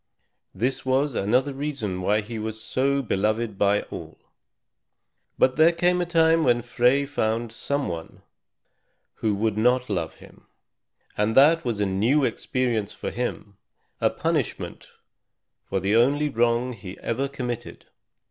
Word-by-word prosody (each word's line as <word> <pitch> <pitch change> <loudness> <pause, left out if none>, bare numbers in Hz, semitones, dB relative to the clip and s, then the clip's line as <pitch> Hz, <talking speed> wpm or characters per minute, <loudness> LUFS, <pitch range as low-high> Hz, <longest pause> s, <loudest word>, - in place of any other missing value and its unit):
This 130 +3 -1
was 135 +2 +1
another 125 +8 +1
reason 135 -10 -3
why 105 +4 +2
he 110 +2 -6
was 110 0 -4
so 140 +4 0
beloved 110 0 0
by 100 +1 +3
all. - - -9 1.2
But 130 +1 +3
there 160 +2 +6
came 180 +1 +1
a 175 - -2
time 165 -1 +4
when 120 -4 +2
Frey 125 +3 +2
found 115 -4 -1
some 140 +5 -2
one 85 -1 -7 0.9
who 110 -2 0
would 110 +1 0
not 125 +1 +2
love 85 -5 -2
him; - - -17 0.7
and 105 +3 0
that 160 +5 +6
was 115 -4 -2
a 105 - +2
new 110 +10 +2
experience 120 -6 -1
for - - -5
him, 110 -4 -4 0.4
a - - +3
punishment - - -3 0.8
for 95 - 0
the 100 +3 +1
only 140 +6 +3
wrong 120 0 +1
he 95 -4 -9
ever 130 +4 -1
committed. 125 -4 -6
120 Hz, 140 wpm, -25 LUFS, 105-140 Hz, 1.2 s, there